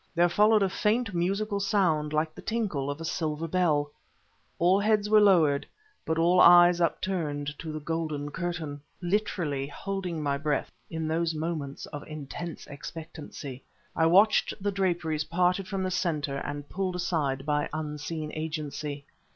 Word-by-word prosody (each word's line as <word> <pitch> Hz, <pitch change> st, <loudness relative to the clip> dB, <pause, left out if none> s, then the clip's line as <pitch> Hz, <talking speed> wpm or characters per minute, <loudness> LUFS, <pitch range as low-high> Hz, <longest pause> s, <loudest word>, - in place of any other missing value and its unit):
There 175 Hz, +1 st, +4 dB
followed 210 Hz, +3 st, +4 dB
a -, -, +3 dB
faint, 210 Hz, +3 st, 0 dB
musical 200 Hz, +4 st, 0 dB
sound, 180 Hz, -7 st, +1 dB
like 155 Hz, +1 st, 0 dB
the -, -, -10 dB
tinkle 200 Hz, -12 st, -2 dB
of 145 Hz, +2 st, -4 dB
a 165 Hz, -, -5 dB
silver 160 Hz, 0 st, -2 dB
bell. 155 Hz, -4 st, +1 dB, 0.7 s
All 180 Hz, +3 st, +4 dB
heads 210 Hz, 0 st, +2 dB
were 215 Hz, -1 st, +7 dB
lowered, 165 Hz, -8 st, +4 dB, 0.4 s
but 160 Hz, -, 0 dB
all 175 Hz, +2 st, +4 dB
eyes 175 Hz, 0 st, +8 dB
upturned 150 Hz, -4 st, -1 dB
to 160 Hz, -, -5 dB
the 155 Hz, -, -4 dB
golden 155 Hz, -2 st, -3 dB
curtain. 165 Hz, -5 st, -4 dB, 0.2 s
Literally 175 Hz, -7 st, -1 dB
holding 180 Hz, 0 st, -4 dB
my 140 Hz, -1 st, 0 dB
breath, 150 Hz, 0 st, -1 dB, 0.2 s
in 160 Hz, -1 st, -3 dB
those 165 Hz, 0 st, 0 dB
moments 155 Hz, -3 st, -4 dB
of 145 Hz, -1 st, -7 dB
intense 155 Hz, +2 st, -7 dB
expectancy, 145 Hz, -2 st, -8 dB, 0.3 s
I 160 Hz, -, +3 dB
watched 200 Hz, +6 st, +4 dB
the 205 Hz, +1 st, -1 dB
draperies 175 Hz, -6 st, 0 dB
parted 180 Hz, +3 st, +1 dB
from 195 Hz, -2 st, -2 dB
the 185 Hz, -, -1 dB
center 160 Hz, -6 st, -1 dB
and 145 Hz, +1 st, -5 dB
pulled 185 Hz, -1 st, -2 dB
aside 150 Hz, -7 st, -1 dB
by 150 Hz, -1 st, 0 dB
unseen 155 Hz, 0 st, -4 dB
agency. 150 Hz, -2 st, -4 dB
165 Hz, 150 wpm, -28 LUFS, 150-185 Hz, 0.7 s, eyes